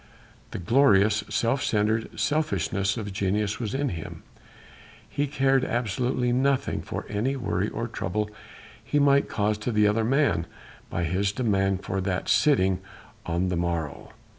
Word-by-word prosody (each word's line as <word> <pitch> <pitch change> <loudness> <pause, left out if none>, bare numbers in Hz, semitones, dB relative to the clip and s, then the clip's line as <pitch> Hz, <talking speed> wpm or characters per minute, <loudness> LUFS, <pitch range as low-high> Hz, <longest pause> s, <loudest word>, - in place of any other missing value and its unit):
The - - -6
glorious, 105 -1 +4
self 125 +4 +1
centred 110 +1 0
selfishness 115 -6 0
of 105 -3 -5
genius 100 +2 -1
was 115 0 -3
in 140 0 0
him. 80 -3 -7 0.8
He 145 +1 -1
cared 135 -1 +2
absolutely 120 +2 0
nothing 135 +2 +1
for - - -5
any 110 +7 -1
worry 105 -6 -1
or 115 +2 -4
trouble 105 -1 -2 0.6
he 145 - -1
might 140 -1 +4
cause 105 0 0
to 115 +3 -2
the 105 -1 +4
other 110 +2 +2
man 120 - +2 0.4
by 85 - -2
his 95 +4 0
demand 100 -4 0
for 95 0 -2
that 95 -1 -2
sitting 95 -11 +3 0.5
on 85 +2 0
the 90 - -1
morrow. 85 -4 -3
105 Hz, 145 wpm, -26 LUFS, 95-130 Hz, 0.8 s, glorious